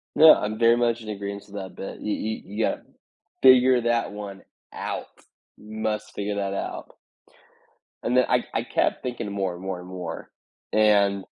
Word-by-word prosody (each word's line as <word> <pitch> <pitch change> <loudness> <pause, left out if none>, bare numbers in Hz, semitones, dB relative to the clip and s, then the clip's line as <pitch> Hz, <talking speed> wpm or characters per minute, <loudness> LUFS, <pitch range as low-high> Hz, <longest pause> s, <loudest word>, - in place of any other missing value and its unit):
Yeah, 160 0 +10
I'm 110 +2 -3
very 115 0 +6
much 120 -1 +1
in 110 - -11
agreeance 100 -1 -5
with 100 - -13
that 95 -2 -7
but, 95 - -7
you 105 - -1
you 110 +1 -3
you 105 +3 -1
gotta - - -2 0.6
figure 130 -1 +7
that 120 -2 0
one 100 -2 -8 0.3
out. - - -5 0.5
You 105 +1 -14
must 110 0 -2
figure 105 0 -3
that 100 -1 -2
out. - - -5 1.1
And 125 - +1
then 125 - +5
I - - +3
I - - 0
kept - - 0
thinking 120 -5 -4
more 95 -3 -1
and 90 - -10
more 95 -1 -4
and 90 - -11
more, 90 -3 -7 0.4
and 100 -2 +4
105 Hz, 180 wpm, -25 LUFS, 100-115 Hz, 1.1 s, Yeah